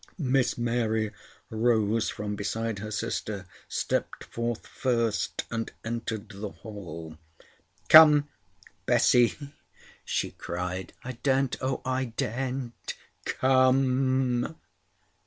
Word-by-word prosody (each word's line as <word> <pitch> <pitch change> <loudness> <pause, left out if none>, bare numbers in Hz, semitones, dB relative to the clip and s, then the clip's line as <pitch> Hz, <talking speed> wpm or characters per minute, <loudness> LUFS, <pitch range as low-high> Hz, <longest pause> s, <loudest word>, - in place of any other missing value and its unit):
Miss 135 -5 +1
Mary 115 -2 0 0.4
rose 110 -1 +2
from 105 0 -4
beside 110 +1 -2
her 105 +1 -5
sister, 105 -2 -3 0.2
stepped - - -2
forth 115 -1 -3
first, 115 -4 -1
and 115 -1 -3
entered 115 -2 -3
the 105 0 -6
hall. 85 -8 -9 0.7
"Come, 150 -2 +9 0.6
Bessie," 135 +4 +3 0.5
she - - -1
cried. 90 +1 -5
"I 130 - -4
daren't. 135 -1 +2
Oh, 130 +1 -2
I 130 0 0
daren't." 125 +1 -4 0.3
"Come!" 130 0 +2
120 Hz, 95 wpm, -28 LUFS, 110-130 Hz, 0.7 s, Come